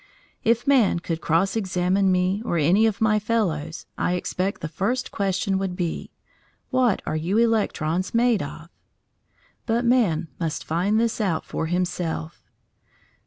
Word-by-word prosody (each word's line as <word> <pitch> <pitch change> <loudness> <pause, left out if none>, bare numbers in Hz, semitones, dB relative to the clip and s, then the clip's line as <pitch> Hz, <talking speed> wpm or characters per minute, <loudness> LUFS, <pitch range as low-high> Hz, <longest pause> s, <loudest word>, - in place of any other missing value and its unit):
If 235 +2 +2
man 260 -10 +4
could 165 -1 -4
cross 170 +6 +1
examine 190 -1 +1
me 185 +3 +1
or 175 -7 -1
any 180 +9 +4
of 215 -1 -2
my 215 -1 +3
fellows, 180 - -1
I 180 - +1
expect 185 +2 -2
the - - -3
first 225 +10 -2
question 195 -1 0
would 190 -2 -2
be 175 -2 -3 0.6
What 255 -6 +2
are 155 - -2
you 170 +7 0
electrons 195 -7 +1
made 235 -2 +3
of? 160 +3 -8 1.0
But 235 +1 +1
man 205 -10 +2
must 165 -3 -3
find 185 +7 +1
this 230 0 0
out 175 -6 0
for 160 - -3
himself. 175 -2 -3
190 Hz, 145 wpm, -24 LUFS, 170-225 Hz, 1.0 s, man